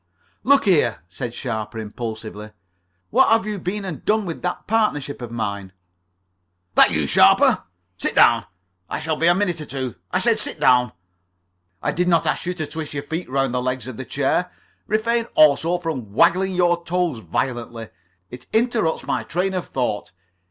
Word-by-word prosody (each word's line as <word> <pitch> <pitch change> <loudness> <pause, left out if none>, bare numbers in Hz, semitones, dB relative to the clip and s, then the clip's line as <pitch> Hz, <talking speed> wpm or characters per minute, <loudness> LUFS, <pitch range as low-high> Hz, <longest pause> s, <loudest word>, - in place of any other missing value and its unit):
"Look 280 -2 +4
here," 135 - +2
said 120 +6 -6
Sharper 110 -3 -4
impulsively, 110 -1 -6 0.6
"what 260 +4 +5
have 225 0 +3
you 210 -2 -3
been 195 +3 -3
and 175 -6 -6
done 215 -1 +1
with 165 -3 -5
that 180 - -3
partnership 205 - 0
of 120 - -6
mine?" 100 -5 -4 1.0
"That - - +6
you, 75 -3 0
Sharper? 70 - +4 0.3
Sit - - -2
down. - - +5 0.4
I - - -3
shall 160 -1 -1
be 165 +2 +1
a 175 - +5
minute 175 -4 -1
or - - -6
two. 130 -3 -4 0.2
I - - +1
said, - - +2
sit - - -5
down. 125 -2 +4 0.9
I - - +1
did 180 +1 0
not 170 -2 +3
ask - - -1
you 180 - -1
to 160 -3 -3
twist 155 -1 -6
your 140 - -3
feet 160 +2 -5
round 135 -1 0
the 125 - 0
legs 130 0 -2
of 130 -3 -7
the 130 - -5
chair. 145 +8 0 0.4
Refrain 230 +2 +1
also 155 +3 +4
from 145 - -5
waggling 185 - +3
your 175 -1 +2
toes 175 -6 -1
violently. 115 +3 -3 0.4
It 125 - -10
interrupts 220 -7 +1
my - - -1
train 190 +2 -1
of 185 -2 -3
thought. 120 -7 -3
155 Hz, 175 wpm, -22 LUFS, 120-180 Hz, 1.0 s, That